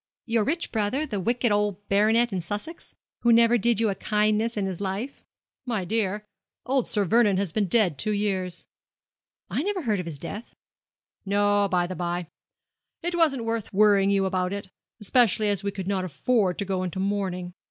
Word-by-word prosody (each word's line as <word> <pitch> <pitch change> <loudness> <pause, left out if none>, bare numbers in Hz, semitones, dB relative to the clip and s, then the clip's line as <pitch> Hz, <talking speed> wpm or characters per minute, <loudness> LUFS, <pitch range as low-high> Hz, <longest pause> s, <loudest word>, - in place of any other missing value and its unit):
'Your 230 -2 +1
rich 330 +9 -1
brother, 225 +7 0
the 210 -9 -3
wicked 235 +4 0
old 205 -1 0
baronet 220 +3 +3
in 185 - -1
Sussex, 205 - -7 0.2
who 235 - +3
never 230 +1 +5
did 235 +1 +2
you 225 - +2
a - - -1
kindness 215 +3 0
in 200 - 0
his 190 -1 -4
life?' 205 +8 -4 0.4
'My 220 -6 -1
dear, 210 +1 -1 0.4
old 260 -1 +1
Sir 205 -2 +1
Vernon 210 -1 +3
has 195 -3 -1
been 205 +2 0
dead 180 - +2
two 215 - 0
years.' 190 -4 -2 0.9
'I - - 0
never 385 0 -2
heard 215 -6 0
of 180 - -5
his 155 -4 -6
death.' 205 +9 -8 0.7
'No, 205 0 +2
by 180 -1 +2
the 185 +1 -5
bye. 175 +1 -2 0.8
It 350 +1 -1
wasn't 305 -8 +2
worth 225 -2 -3
while 195 - -4
worrying 200 -2 +5
you 195 -1 +2
about 185 0 -1
it, 200 -1 -6 0.3
especially 215 -1 +3
as 200 -1 0
we 200 - 0
could 195 -2 -6
not 195 -2 0
afford 185 - 0
to 200 - -3
go 190 -1 -1
into 185 -1 -4
mourning. 190 -3 -2
205 Hz, 190 wpm, -25 LUFS, 190-230 Hz, 0.9 s, never